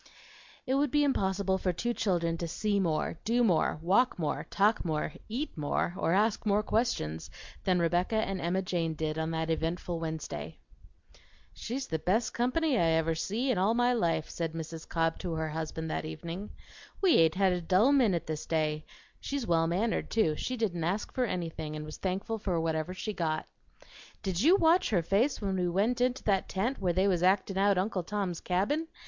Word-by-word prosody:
It 260 - 0
would 280 +1 +2
be 295 +3 +3
impossible 190 -7 +1
for 185 - 0
two 240 +8 -2
children 170 -7 0
to 170 - -2
see 205 +4 0
more, 165 -2 -1
do 240 +2 +2
more, 175 -10 +2
walk 205 +9 +3
more, 150 -2 -2
talk 210 +2 +2
more, 155 -2 -2 0.2
eat 260 +8 -3
more, 150 +2 -1
or 165 - 0
ask 210 +4 +2
more 210 0 +2
questions 80 - -1 0.4
than 185 -2 +3
Rebecca 175 +5 +1
and 195 -4 -1
Emma 180 +3 0
Jane 170 -3 -1
did 155 0 -2
on 160 0 -1
that 160 0 -1
eventful 165 +1 -2
Wednesday. 160 -1 -5 1.0
"She's 255 +3 -4
the 160 -1 -2
best 220 +7 +1
company 255 +2 +1
I - - +3
ever 160 0 +2
see 220 +11 -1
in 210 - 0
all 205 +5 +2
my 245 +1 +3
life," 165 -8 0
said 165 -2 -4
Mrs. 165 0 -7
Cobb 165 -1 0
to 175 -3 -3
her 160 0 -2
husband 160 0 -4
that - - -2
evening. 165 +5 -6 0.5
"We 375 -4 +5
ain't 160 0 +4
had 190 -1 +3
a 180 - -2
dull 190 +10 +4
minute 210 - +3
this 155 -1 -5
day. 155 -1 0 0.3
She's 275 -3 -3
well 165 -4 +2
mannered, 200 +7 0
too; 165 -9 +2
she 255 +10 -3
didn't 185 -8 -1
ask 190 +6 -2
for 255 -2 +1
anything, 165 -6 -4
and 150 0 -5
was 155 - -8
thankful 195 +4 -2
for 185 -5 -1
whatever 160 +2 -1
she 215 +3 -4
got. 160 -4 -1 0.8
Did 190 -3 -1
you 330 +9 +6
watch 340 -1 +4
her 180 -6 +2
face 215 - +1
when 195 -1 0
we 180 -1 +1
went 215 +8 +1
into 250 +1 +1
that 195 -3 +1
tent 220 +6 -1
where 180 -2 +2
they 190 +3 +2
was 180 -3 +2
actin' 190 +1 +2
out 200 -1 +4
Uncle 190 0 0
Tom's 190 -2 -3
Cabin? 210 - 0
185 Hz, 195 wpm, -30 LUFS, 165-220 Hz, 1.0 s, you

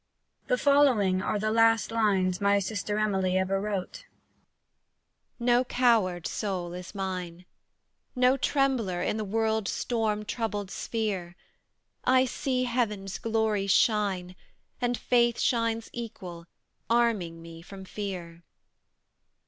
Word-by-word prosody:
The - - +2
following 255 - +3
are 210 - -1
the 215 +1 -1
last 225 0 +3
lines 195 -5 +1
my 200 0 +4
sister 205 +1 -2
Emily 190 -3 +1
ever 190 +1 0
wrote: 210 - -4 1.3
No 245 +1 +3
coward 225 -9 +2
soul 185 -5 -3
is 180 +3 -8
mine, 180 -2 -4 0.7
No 250 +1 +4
trembler 260 -9 0
in - - -1
the 215 - -2
world's 220 0 0
storm 215 -3 -1
troubled 210 -3 -3
sphere: 195 -6 -3 0.7
I 255 0 +4
see 255 0 -1
Heaven's 210 -6 -2
glories 220 -3 0
shine, 195 -4 +2 0.5
And 245 -1 0
faith 240 -1 +2
shines 230 -2 0
equal, 180 -8 -7 0.4
arming 225 -8 +1
me 165 0 -11
from 190 +2 -11
fear. 180 -5 -6
210 Hz, 115 wpm, -28 LUFS, 185-235 Hz, 1.3 s, my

